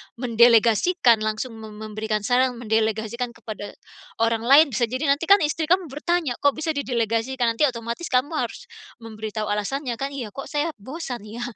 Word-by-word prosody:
mendelegasikan, 235 - +4
langsung 215 +3 -3
mem 215 -1 -10
memberikan 215 0 -3
saran, 250 +2 +2
mendelegasikan 225 +1 -1
kepada 215 -3 -8 0.5
orang 230 0 +1
lain, 285 +4 +8
bisa 235 +1 +1
jadi 255 +5 -4
nanti 300 +4 0
kan 400 +1 +7
istri 310 +1 -1
kamu 355 -3 +1
bertanya, 315 0 -1
"Kok 285 -1 +2
bisa 310 +1 -2
didelegasikan?" 240 -2 -1
nanti 265 - +1
otomatis 235 +5 -5
kamu 260 +5 +1
harus - - -4 0.3
memberitahu 215 -1 -5
alasannya 235 +5 -2
kan? 275 +3 -4
Iya, 255 -6 -5
kok 275 - -6
saya 295 +2 0
bosan 250 0 -7
ya? 220 +3 -8
240 Hz, 160 wpm, -23 LUFS, 220-280 Hz, 0.5 s, lain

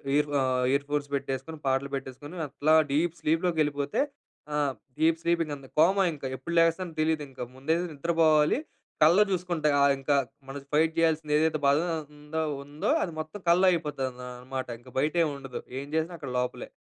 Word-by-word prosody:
Year 150 0 +2
ఆహ్, 130 -1 +1
year 140 +1 +1
phones 145 -1 -1
పెట్టేసుకుని, 135 +3 -4
పాటలు 135 +1 +1
పెట్టేసుకుని, 135 +5 -7
అట్లా 145 +3 +1 0.2
డీప్ 165 +3 +1
స్లీప్‌లోకెళిపోతే 155 - +1 0.5
ఆహ్, 145 -2 +1 0.3
డీప్ 160 +1 +4
స్లీప్ 170 0 +1
ఇంకంతే, 145 -3 -7
కోమా 190 +5 +5
ఇంక. 150 - -12
ఎప్పుడు 130 +6 -6
లేగస్తానో 165 +1 +2
తెలీదింక. 155 -4 -1 0.2
ముందైతే 160 +6 0
నిద్రపోవాలి. 155 - +3 0.4
కలలో 170 +7 +7
చూసుకుంట. 175 -4 -2
ఆహ్, 140 0 +5
ఇంక 135 +2 -2 0.4
మనద్ 140 0 -8
ఫైట్ 160 +2 +3
జేయాల్సిందేదైతే 155 -1 +2
బాధ 140 +1 +4 0.4
అంద 150 +1 -12 0.3
ఉందో, 145 +2 -2
అది 170 - -3
మొత్తం 155 +6 -6
కలలో 180 +3 +5
అయిపోతది 150 -6 -1 0.3
అనమాట. 130 +1 -5
ఇంక 125 +2 -16
బయటేం 155 +4 +2
ఉండదు. 135 -2 -7 0.2
ఏం 140 - -7
జేసినా, 160 +2 -1
అక్కడ 140 -5 -7
లోపలే. 125 0 -3
150 Hz, 155 wpm, -28 LUFS, 140-165 Hz, 0.5 s, కలలో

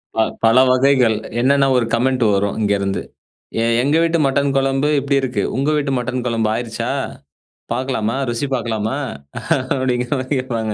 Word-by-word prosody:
ப - - -10 0.3
பல 115 +2 +5
வகைகள் 130 -3 +3 0.2
என்னன்ன்னா, 135 +2 +3
ஒரு 120 - +1
கமெண்ட் 125 +1 +1
வரும் 100 +2 0
இங்கருந்து. 100 -1 0 0.6
எ - - +1 0.2
எங்க 145 +4 +2
வீட்டு 165 0 +1
மட்டன் 140 +1 +1
குழம்பு 135 +2 +1
இப்படி 140 0 0
இருக்கு. 130 -1 -1
உங்க 140 +3 +1
வீட்டு 140 -2 -1
மட்டன் 125 0 -3
குழம்பு 115 -2 0
ஆயிருச்சா? 115 -1 -3 0.8
பார்க்கலாமா? 125 -3 -1 0.2
ருசி 130 +4 -2
பார்க்கலாமா? 115 +1 -2 0.8
அப்படிங்கிற 125 -1 -1
மாதிரி 130 +2 -2
கேட்பாங்க. 115 -4 -3
125 Hz, 145 wpm, -19 LUFS, 115-135 Hz, 0.8 s, பல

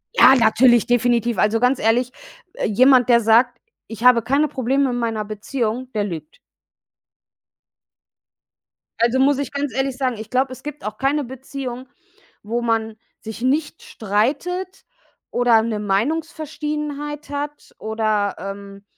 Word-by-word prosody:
Ja, 265 - +7
natürlich, 240 0 +4
definitiv. 240 -1 +1
Also, 215 +2 +2
ganz 250 +2 +2
ehrlich, 240 +3 +1 0.5
jemand, 255 +3 +4
der 235 -1 +6
sagt: 230 +2 +3 0.3
„Ich 225 0 -8
habe 250 -2 +6
keine 280 +5 +2
Probleme 270 0 0
meiner 230 -3 -2
Beziehung“, 230 +3 -4
der 210 -2 0
lügt. 165 -6 -7 2.6
Also, 235 +2 +3
muss 275 +1 +3
ich 280 -2 -4
ganz 280 -4 -3
ehrlich 265 0 -1
sagen, 255 -4 -1
ich 220 +1 -9
glaube, 260 +2 0
es 255 - -9
gibt 295 0 -8
auch 215 0 -5
keine 280 +2 0
Beziehung, 260 0 -7 0.6
wo 235 +3 -2
man 225 -1 -1 0.3
sich 220 +1 -8
nicht 295 +5 -1
streitet 305 - -2 0.5
oder 240 -2 +4
'ne 220 -2 -2
Meinungsverschiedenheit 295 - -3
hat 290 +1 -6
oder, 215 -2 -1
ähm, 195 0 -8
245 Hz, 130 wpm, -21 LUFS, 220-275 Hz, 2.6 s, Ja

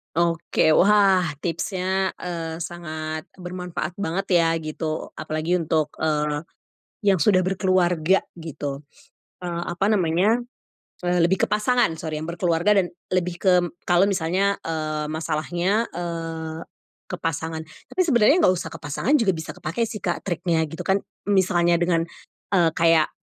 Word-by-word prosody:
Oke, 165 -2 +2
wah, 195 -2 +5 0.2
tipsnya, 185 +3 -1
eee, 165 -2 -4
sangat 155 -2 -5 0.2
bermanfaat 180 -1 -5
banget 195 0 -2 0.2
ya, 165 - +2
gitu, 155 0 -4
apalagi 155 +3 -1
untuk, 160 -3 +1 0.2
eee, 150 -1 0 0.6
yang 195 -4 +4
sudah 185 -4 +4
berkeluarga, 185 -2 +2 0.2
gitu. 145 -3 -5 0.6
Eee, 170 -1 -3
apa 195 +4 0
namanya, 195 +3 +3 0.7
eee, 175 0 +1
lebih 175 +3 +2
ke - - 0
pasangan 215 0 +2
sori, 155 -1 -4
yang 155 - -4
berkeluarga 175 +3 +2
dan 180 - +1 0.2
lebih 180 -1 0
kem 180 -3 +3
kalau 175 +2 +4
misalnya, 195 +1 +1
eee, 155 -2 -2
masalahnya, 170 +6 0
eee, 165 -2 -5 0.5
ke - - -3
pasangan. 160 0 -2 0.3
Tapi, - - -7
sebenarnya 255 +4 +5
nggak 185 - +5
usah 175 - -5
ke - - -8
pasangan, 150 - -2
juga 195 -6 +2
bisa 160 0 -6
kepakai 165 +10 -3
sih 215 -1 -4
Kak 175 -4 -2
triknya, 175 -3 0
gitu 160 +4 -6
kan, 195 +1 +2 0.2
misalnya 175 -3 +3
dengan, 170 -1 +1 0.5
eee, 170 -3 +4
kayak, 165 -1 +3
175 Hz, 140 wpm, -23 LUFS, 160-190 Hz, 0.7 s, wah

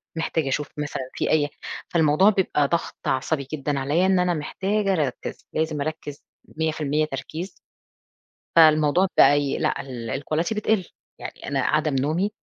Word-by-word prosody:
محتاجة 160 -2 -1
أشوف 150 +2 -1
مثلًا 145 -3 -4
في - - -1
أي 150 -2 +2 0.4
فالموضوع 160 +4 +4
بيبقى 185 -8 +1
ضغط 170 +2 -3
عصبي 140 +1 -1
جدًا 145 -1 -1
عليّا، 150 +7 +1
إن 190 -1 +3
أنا 180 -1 +2
محتاجة 195 +6 -1
أركّز 145 -7 -3
لازم 155 -2 -1
أركّز 150 -1 -5 0.3
100% 155 -1 0
تركيز. 155 +6 -6 1.1
فالموضوع 155 +3 +5
فأي 145 -1 +4
لأ - - 0
ال 125 0 -5
الQuality 165 +8 -1
بتقِل 210 -3 +1 0.3
يعني - - -8
أنا 140 -1 0
عدم 155 +2 +1
نومي، 155 +10 0
155 Hz, 140 wpm, -24 LUFS, 145-170 Hz, 1.1 s, فالموضوع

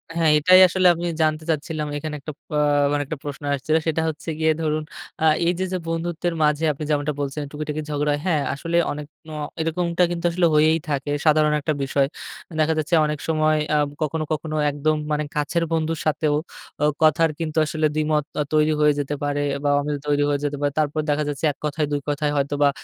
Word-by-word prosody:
হ্যাঁ, 165 -2 +3
এটাই 185 +5 +6
আসলে 185 +1 +2
আমি 170 - -4 0.2
জানতে 155 0 +1
চাচ্ছিলাম, 155 0 -2
এখানে 150 +1 -5
একটা 155 +2 -7 0.2
প - - -70 0.4
মানে 145 0 +1
একটা 150 +2 -5
প্রশ্ন 145 0 -6
আসছে। 140 +2 -4 0.2
সেটা 160 0 +1
হচ্ছে 155 +1 -7
গিয়ে 160 0 +3
ধরুন 155 -1 0 0.4
আ - - 0 0.2
এই 175 - +3
যে, 190 - 0
যে - - +1
বন্ধুত্বের 170 +1 -2
মাঝে 150 +1 +2
আপনি 150 +1 -6
যেমনটা 150 0 0
বলছেন, 140 +1 -3
টুকিটাকি 150 0 -4
ঝগড়া 150 0 0
হয়। 145 - -2
হ্যাঁ, 160 -5 +2
আসলে 165 +4 -2
অনেক 150 0 -6 0.2
ন 155 - -9 0.3
এরকমটা 170 +2 0
কিন্তু 175 0 -3
আসলে 175 0 +2
হয়েই 155 +2 +4
থাকে, 145 0 -2
সাধারণ 155 -1 +4
একটা 155 +1 0
বিষয়। 135 0 +1 0.5
দেখা 160 +1 +3
যাচ্ছে 155 +2 +1
অনেক 150 -1 -2
সময় 155 -1 +2
অ্যা 150 - +2 0.2
কখনো, 155 +1 -1
কখনো 155 0 -4 0.2
একদম 155 +2 0 0.2
মানে 150 0 0
কাছের 150 +3 0
বন্ধুর 160 0 -1
সাথেও 150 -1 +1 0.5
ও - - +5 0.2
কথার 160 +1 +4
কিন্তু 160 -1 -3
আসলে 155 0 -1
দ্বিমত 155 -1 +1 0.2
আ - - +2
তৈরি 155 0 +3
হয়ে 150 -1 +4
যেতে 145 +1 -2
পারে 145 0 0 0.2
বা 145 - +2
অমিল 145 0 -2
তৈরি 145 0 +2
হয়ে 145 - +1
যেতে 145 0 -2
পারে। 145 0 +1
তারপর 150 0 0
দেখা 150 +1 +1
যাচ্ছে, 145 +2 -3
১ 140 - -15
কথায়, 150 +1 0
২ 145 -1 -1
কথায় 145 0 0
হয়তো 140 0 0
বা 145 - +6
155 Hz, 205 wpm, -23 LUFS, 145-160 Hz, 0.5 s, এটাই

